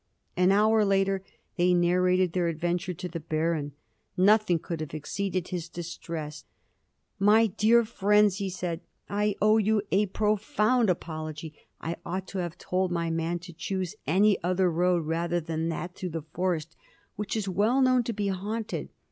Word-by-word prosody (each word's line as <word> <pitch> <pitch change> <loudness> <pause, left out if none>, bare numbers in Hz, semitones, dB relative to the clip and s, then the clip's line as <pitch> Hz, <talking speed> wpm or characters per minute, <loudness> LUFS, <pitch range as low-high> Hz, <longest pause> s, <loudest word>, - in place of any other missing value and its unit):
An 180 +1 +4
hour 215 +2 +4
later 195 -1 +1 0.3
they 180 0 +4
narrated 180 0 +2
their 180 -2 +1
adventure 175 +2 -2
to 180 - -5
the 170 -1 -5
Baron. 155 -2 -1 0.4
Nothing 205 -1 +4
could 165 0 -5
have 155 -1 -5
exceeded 185 +3 -3
his 170 -2 -4
distress. 165 -3 -6 0.8
"My 210 +3 +5
dear 225 +3 +3
friends!" 210 -2 +3
he 200 -2 -2
said, 175 -2 -4 0.3
"I 205 0 0
owe 215 +1 +5
you 215 0 +2
a 205 +2 +3
profound 215 +3 +1
apology. 155 -2 -4 0.3
I 165 +1 -4
ought 185 +2 -4
to 195 - -4
have 175 -2 -4
told 185 0 -1
my 170 -1 -1
man 165 +1 -1
to 175 - -10
choose 185 +1 -3
any 195 +5 +3
other 180 0 +2
road 175 0 +1
rather 170 +2 0
than 165 0 -3
that 175 +2 -4
through 185 0 -5
the 160 -2 -5
forest, 170 -3 -1 0.4
which 210 +2 -3
is 210 -2 -2
well 210 +8 +2
known 255 -1 +4
to 235 - -2
be 205 -1 -1
haunted. 210 +4 -3
180 Hz, 165 wpm, -28 LUFS, 170-205 Hz, 0.8 s, My